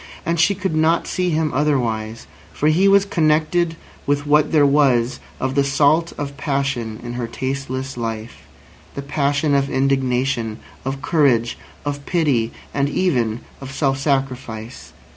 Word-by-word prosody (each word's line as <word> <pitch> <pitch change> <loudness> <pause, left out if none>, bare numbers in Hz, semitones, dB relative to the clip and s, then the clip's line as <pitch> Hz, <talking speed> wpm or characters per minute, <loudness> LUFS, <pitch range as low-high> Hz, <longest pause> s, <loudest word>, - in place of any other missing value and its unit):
And 170 0 0
she 200 +5 +4
could 190 -4 -2
not 160 +2 +2
see 180 -1 -1
him 155 -1 0
otherwise, 115 -6 -1 0.3
for 150 - +1
he 180 +6 +4
was 200 0 +5
connected 165 -1 +1 0.3
with 145 0 +1
what 150 +1 +3
there 150 -3 +5
was 135 -4 +3 0.2
of 130 0 -1
the 140 0 +3
salt 145 +4 +2
of 140 -1 -4
passion 135 -6 -2
in 120 0 -5
her 120 -1 -3
tasteless 130 +1 -4
life—the 115 +4 -8
passion 145 +1 0
of 140 0 +2
indignation, 130 -4 0 0.3
of 135 +1 -4
courage, 130 -8 +2 0.3
of 145 0 -3
pity, 140 -10 +1 0.2
and 140 0 +1
even 125 -10 0 0.2
of 135 -1 -7
self 135 -1 0
sacrifice. 130 -5 -3
140 Hz, 140 wpm, -20 LUFS, 125-155 Hz, 0.3 s, was